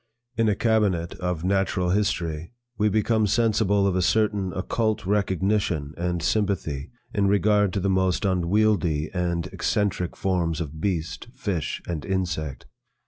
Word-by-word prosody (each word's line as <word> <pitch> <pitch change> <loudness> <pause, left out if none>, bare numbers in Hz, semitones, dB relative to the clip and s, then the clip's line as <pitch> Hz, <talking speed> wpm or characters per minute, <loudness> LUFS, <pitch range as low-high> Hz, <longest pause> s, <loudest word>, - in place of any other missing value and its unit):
In 115 -1 +2
a 105 - +2
cabinet 100 -7 +1
of 90 -2 -2
natural 95 -1 +1
history, 85 -3 -1 0.2
we 105 0 +2
become 110 +1 +2
sensible 105 -2 +2
of 95 -2 +1
a 95 - +2
certain 105 0 +1
occult 110 +2 -1
recognition 95 -6 0
and 85 -1 -2
sympathy 85 -10 -1 0.2
in 100 -2 +2
regard 105 0 +3
to 100 - 0
the 100 - -1
most 95 0 +1
unwieldly 90 -4 +1
and 85 -2 -1
eccentric 100 -4 -1
forms 85 -4 0
of 80 -1 -5
beast, 85 -1 -2
fish, 95 - -3
and 80 -5 -3
insect. 80 -6 -2
95 Hz, 140 wpm, -25 LUFS, 85-105 Hz, 0.2 s, regard